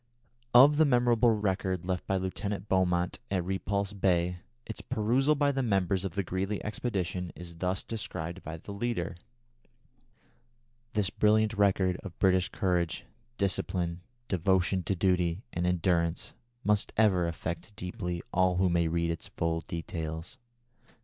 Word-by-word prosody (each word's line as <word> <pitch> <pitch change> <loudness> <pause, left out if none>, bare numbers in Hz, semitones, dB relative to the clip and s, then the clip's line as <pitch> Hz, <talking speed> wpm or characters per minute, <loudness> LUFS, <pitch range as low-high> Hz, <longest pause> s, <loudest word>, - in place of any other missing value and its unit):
Of 140 +4 +8
the 160 - +6
memorable 120 -3 +4
record 95 -4 0
left 90 -1 -2
by 95 - +1
Lieutenant 100 +2 -3
Beaumont 90 -2 +1
at 95 -3 0
Repulse 100 +1 -1
Bay, 90 -2 +1 0.3
its 110 - -6
perusal 130 +8 +2
by 145 0 +2
the 135 -1 -1
members 95 -5 +1
of 95 -2 -4
the 100 - 0
Greely 95 +3 -2
expedition 95 -5 -2
is 85 -1 -9
thus 90 +2 -1
described 90 -5 -5
by 80 +1 -6
the 90 - -10
leader: 100 -6 -2 1.8
"This 105 -2 +1
brilliant 110 +1 +3
record 95 -3 +2
of 100 -4 -10
British 95 -2 +3
courage, 90 -3 -1 0.3
discipline, 90 -3 -1 0.3
devotion 95 +1 +2
to 95 - 0
duty 90 +1 +1
and 90 +1 0
endurance, 85 -1 0 0.3
must 105 -1 +2
ever 95 -6 +4
affect 85 +4 -5
deeply 90 -1 -4
all 95 0 +3
who 95 0 +3
may 85 -1 +2
read 85 +1 0
its 85 - -4
full 80 0 -1
details. 85 - -5
95 Hz, 140 wpm, -30 LUFS, 85-105 Hz, 1.8 s, Of